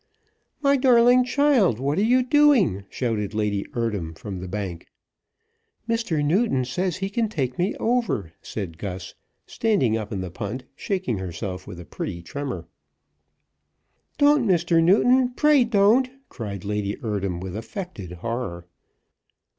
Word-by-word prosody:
"My 280 0 +4
darling 250 -1 +5
child, 255 - +3
what 140 +6 0
are - - +3
you 250 +3 +4
doing?" 250 - +4
shouted 110 -4 -2
Lady 105 -2 -1
Eardham 105 -9 -2
from 95 -3 -6
the 90 - -6
bank. 95 -3 -5 1.0
"Mr. 225 -11 0
Newton 160 - +2
says 175 +7 -1
he 195 +1 -3
can 225 +1 0
take 130 - -3
me 185 +4 0
over," 225 - -1
said 85 -7 -6
Gus, 95 -1 -6 0.3
standing 195 - +1
up 105 -2 -5
in 100 -3 -3
the 90 -2 -5
punt, 115 +7 -5
shaking 185 - -2
herself 95 +1 -5
with 90 -4 -8
a 90 - -9
pretty 85 0 -6
tremor. 140 +9 -5 1.5
"Don't, 290 -4 +4
Mr. 170 -2 +3
Newton; 245 +8 +4
pray 300 -3 +5
don't!" 230 +3 +4 0.2
cried 100 -5 -6
Lady 105 0 -2
Eardham, 100 -5 -2
with 95 0 -6
affected 110 - -7
horror. 90 -3 -4
130 Hz, 140 wpm, -24 LUFS, -, 1.5 s, darling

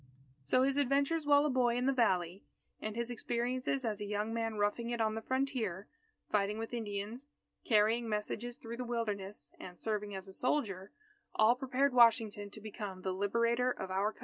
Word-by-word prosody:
So 255 - +3
his 275 +1 +1
adventures 285 +3 +2
while 290 0 +6
a - - +2
boy 245 -2 +2
in 250 +1 0
the 275 - +3
Valley, 185 -7 +1 0.4
and 215 0 -4
his 235 +1 -2
experiences 245 +3 -1
as 215 -3 -2
a - - -2
young 210 +2 -2
man 225 -1 -1
roughing 210 +3 0
it 240 -1 -2
on 220 -1 +2
the 225 - -3
frontier, 245 -7 -1 0.4
fighting 205 0 +1
with 225 +2 -5
Indians, 220 +3 -4 0.4
carrying 225 +1 +3
messages 220 +3 -3
through 230 0 -7
the 250 - -3
Wilderness, 210 -9 -3
and 180 -1 -9
serving 210 -2 -2
as 190 0 -5
a 190 - -10
soldier, 205 -7 -1 0.4
all 220 +2 +6
prepared 265 +1 +1
Washington 225 -4 +4
to 215 - -9
become 205 -3 -7
the 190 - -1
Liberator 235 +5 +1
of 190 -6 -4
our 195 +3 +1
Country. - - -23
225 Hz, 185 wpm, -34 LUFS, 205-250 Hz, 0.4 s, while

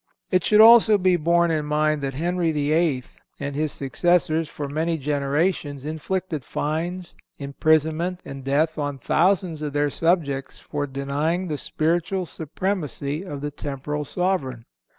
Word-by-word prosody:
It 185 -2 +3
should 215 0 +5
also 225 -1 +8
be 185 -2 +3
borne 170 +1 +2
in 155 -2 0
mind 150 0 +1
that 135 -1 -3
Henry 170 +2 0
VIII. 150 -2 +1 0.4
and 140 -1 -4
his 155 0 0
successors 160 +3 +1
for 145 - -5
many 160 +3 -1
generations 145 0 -1
inflicted 160 0 -3
fines, 170 +6 -3 0.2
imprisonment 160 +5 +1
and 135 -1 -8
death 155 +4 +1
on 145 -1 -2
thousands 170 +3 +1
of 150 -2 -4
their 145 0 +1
subjects 150 -6 0
for 145 -1 -4
denying 145 +6 -2
the 150 - -1
spiritual 175 +4 -1
supremacy 155 -3 -3
of 145 -7 -7
the 145 0 -3
temporal 145 +1 -4
sovereign. 145 -8 -2
155 Hz, 140 wpm, -23 LUFS, 145-175 Hz, 0.4 s, also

